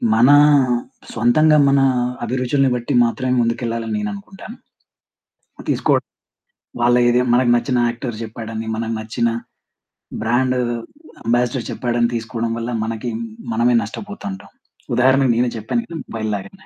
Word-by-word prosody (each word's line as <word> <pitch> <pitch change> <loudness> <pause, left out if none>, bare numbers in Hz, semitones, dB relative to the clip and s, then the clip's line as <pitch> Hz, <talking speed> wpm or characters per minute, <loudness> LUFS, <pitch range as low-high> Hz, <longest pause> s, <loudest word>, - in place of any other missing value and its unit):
మన 120 +4 +5 0.8
సొంతంగా, 150 +7 +4
మన 140 0 +4 0.4
అభిరుచుల్ని 130 +3 +1
బట్టి 120 +3 -3
మాత్రమే 125 +2 -1
ముందుకెళ్ళాలని 115 -1 -2
నేను 105 0 -2
అనుకుంటాను. 195 - -10 1.1
తీసుకోవడం. - - +1 0.8
వాళ్ళ 120 0 +4
ఏదే 120 +1 +3
మనకు 125 0 +3
నచ్చిన 125 +1 0
యాక్టర్ 120 -1 -5
జెప్పాడని, 110 0 -6
మనకు 115 0 -3
నచ్చిన 115 +2 -1 0.9
బ్రాండు 125 +3 +1 0.7
అంబాసిడర్ 120 +1 0
చెప్పాడని, 120 -1 0
తీసుకోవడం 115 0 -3
వల్ల 115 +1 -4
మనకి 115 +2 -4 0.4
మనమే 120 +2 +3
నష్టపోతాంటాం. 110 - -8 0.4
ఉదాహరణకు 130 +1 +4
నేనే 120 +1 +2
చెప్పాను 110 - -2
కాని 165 -3 -6
మొబైల్ 110 -1 -4
లాగానే. 190 - -9
120 Hz, 115 wpm, -19 LUFS, 115-130 Hz, 1.1 s, మన